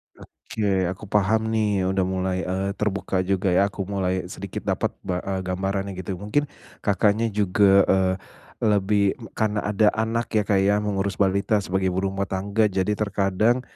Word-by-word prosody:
Oke, 95 -4 -2
aku 95 +3 -10
paham 110 +2 +2
nih 105 -3 +1
udah 95 -1 +1
mulai, 95 0 -1
eee, 95 +2 -1
terbuka 100 -2 -1
juga 95 0 +1
ya, 95 +3 +4
aku 100 -1 -5
mulai 95 -1 -1
sedikit - - -6
dapat - - -1
ba 90 -2 -2
e 95 0 -3
gambarannya 95 +2 -2
gitu. 95 0 -4
Mungkin 105 +10 -1 0.3
Kakaknya 105 +3 +2
juga, 100 -1 +4
eee, 95 -1 +3 0.4
lebih 100 -1 +2 0.2
karena 105 -1 0
ada 105 0 +2
anak 115 +2 -1
ya 110 - +4
Kak 100 - +3
ya 105 +1 +3
mengurus 100 -1 -1
balita 100 +2 +2
sebagai 95 0 -1
ibu 95 - 0
rumah 95 +1 -2
tangga. 100 +3 0
Jadi 95 +1 0
terkadang 105 +3 +1
100 Hz, 160 wpm, -24 LUFS, 95-105 Hz, 0.4 s, ya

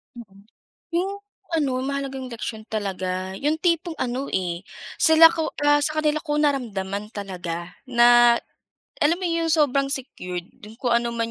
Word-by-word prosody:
Mhm, 200 -4 -14 0.5
yung 370 +3 0 0.4
ano 275 -6 0
mahalagang 270 -2 -4
leksyon 220 -1 -5
talaga, 185 -3 -3
yung 295 +8 -1
tipong 335 -1 0
ano, 255 +3 -2
eh. 175 -1 -2 0.3
Sila 320 0 +8
ko 320 -2 -2
ah, 290 0 +4
sa 310 +1 0
kanila 305 0 0
ko 295 -2 -1
naramdaman 210 -8 -1
talaga, 180 -4 -6
na 240 -1 +5 0.6
alam 315 +3 +3
mo 370 - -5
yung 335 -1 0
sobrang 280 -3 +3
secured. 180 -10 -5 0.3
Kung 245 - +1
ano 235 0 0
man 230 0 -2
250 Hz, 145 wpm, -23 LUFS, 200-300 Hz, 0.6 s, Sila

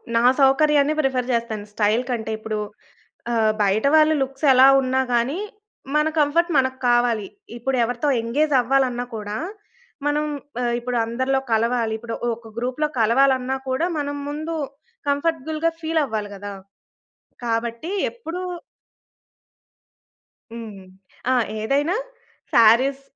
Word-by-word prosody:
నా 230 - +3 0.2
సౌకర్యాన్ని 285 +2 +4
ప్రిఫర్ 260 -3 0
చేస్తాను 225 -3 -2
స్టైల్ 215 +4 +2
కంటే. 220 -2 -2
ఇప్పుడు 215 -1 -3 0.7
ఆహ్, 220 -2 +3
బయటవాళ్ళ 280 +11 +4
లుక్స్ 270 +2 -5
ఎలా 260 +1 +7
ఉన్నా 260 0 0
గాని, 255 +9 +1 0.6
మన 300 +1 +3
కంఫర్ట్ 335 +4 +2
మనకి 260 0 +1
కావాలి. 240 -4 +2 0.3
ఇప్పుడు 260 +2 -1
ఎవరితో 245 +5 -2
ఎంగేజ్ 290 +6 0
అవ్వాలన్నా 250 -1 +1
కూడా, 210 0 -5 0.7
మనం 295 +1 +1 0.4
ఆహ్, 240 - 0
ఇప్పుడు 245 0 -3
అందరిలో 260 +3 0
కలవాలి. 230 0 +1
ఇప్పుడు 230 0 -6 0.2
ఒక 225 -1 -14
గ్రూప్‌లో 255 +5 -1
కలవాలన్నా 260 +3 +3
కూడా, 315 +7 0
మనం 285 0 -3
ముందు 310 +3 -4 0.5
కంఫర్టబుల్‌గా 315 +2 0
ఫీల్ 320 0 0
అవ్వాలి 210 -3 -4
కదా! 205 +1 -7 0.9
కాబట్టి 235 +7 -2 0.2
ఎప్పుడు 365 -7 -7 2.1
హ్మ్. 220 -4 -8 0.5
ఆ! - - +4 0.3
ఏదైనా 285 - +1 0.6
శారీస్ 245 +5 +5
255 Hz, 115 wpm, -22 LUFS, 230-290 Hz, 2.1 s, ఎలా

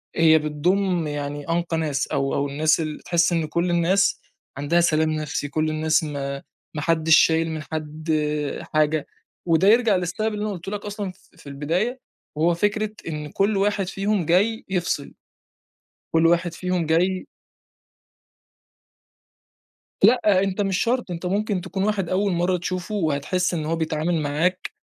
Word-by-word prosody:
هي 160 -1 +5
بتضم 170 +3 0
يعني 145 0 -5
أنقى 170 0 0
ناس 150 -3 -1
أو 135 0 -1
أو 140 - 0
الناس 155 +4 +2
ال 155 -2 -3
بتحس 170 0 +1
إن 165 -2 +1
كل 170 +3 -1
الناس 175 +4 +2 0.4
عندها 150 +5 +2
سلام 160 -2 +2
نفسي، 155 -1 -3
كل 155 +2 0
الناس 155 +1 +1
ما 140 -2 -4 0.3
ما 150 - -4
حدّش 160 0 +4
شايل 165 0 +3
من 160 -1 -4
حد 155 +1 -5 0.6
حاجة، 155 0 +1 0.4
وده 170 +2 +3
يرجع 225 -1 +5
للسبب 185 +5 -1
اللي 210 0 -3
أنا 215 - -2
قُلته 180 +1 -7
لك 210 0 -5
أصلًا 205 -2 -4
ف - - -25
في 165 - -15
البداية، 175 - -2 0.4
وهو 165 +3 +2
فكرة 205 +4 0 0.2
إن 150 -2 -5
كل 200 +1 +1
واحد 200 -1 +1
فيهم 195 -1 -1
جاي 205 +7 +2
يفصِل. 175 -6 -2 1.0
كل 165 0 +4
واحد 170 0 +2
فيهم 180 -2 -1
جاي 180 +4 +1 2.8
لأ، 210 -4 +5
أنت 195 +1 -1
مش 195 -1 0
شرط، 245 -4 0
أنت 170 +1 -5
ممكن 200 +1 0
تكون 190 +1 -3
واحد 200 -4 0
أول 195 +2 +1
مرة 175 +1 +1
تشوفه، 185 +4 -4
وهتحس 175 +1 0
إن 160 -3 -2
هو 165 +2 0
بيتعامِل 160 +1 -1
معاك 160 +6 -1
170 Hz, 155 wpm, -23 LUFS, 155-195 Hz, 2.8 s, هي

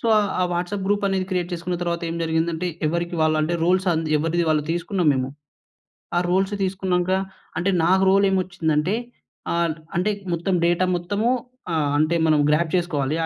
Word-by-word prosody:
So, 230 - -3
ఆహ్, 205 -2 +1
ఆ - - +3
WhatsApp 180 +3 -2
గ్రూపనేది 195 -2 +1
create 180 -1 -1
చేసుకున్న 175 +1 -3
తర్వాత 170 0 -2
ఏం 165 - -4
జరిగిందంటే, 160 +1 0 0.2
ఎవరికి 170 +2 -1
వాళ్ళంటే, 155 +1 +1
రోల్స్ 185 +2 +2
ఆంద్ 160 -1 -1
ఎవరిది 165 +3 0
వాళ్ళు 155 -1 +2
తీసుకున్నాం 175 0 -1
మేము. 130 -1 -1 0.9
ఆ - - +5
రోల్స్ 190 +2 +1
తీసుకున్నాంక, 185 -1 0 0.5
అంటే, 190 +3 +1
నాకు 190 +2 +4
రోలేమొచ్చిందంటే, 185 -3 +1 0.6
ఆల్ట్ 170 -2 0 0.2
అంటే 180 +4 +1
ఇక 200 - -14
మొత్తం 175 +3 -1
డేటా 175 +2 +2
మొత్తము 200 +6 -1 0.5
ఆహ్, 150 -2 +1
అంటే 155 +3 +2
మనం 155 -1 +4
గ్రాబ్ 155 +1 +2
చేసుకోవాలి, 155 -5 -1
175 Hz, 160 wpm, -23 LUFS, 160-190 Hz, 0.9 s, ఆ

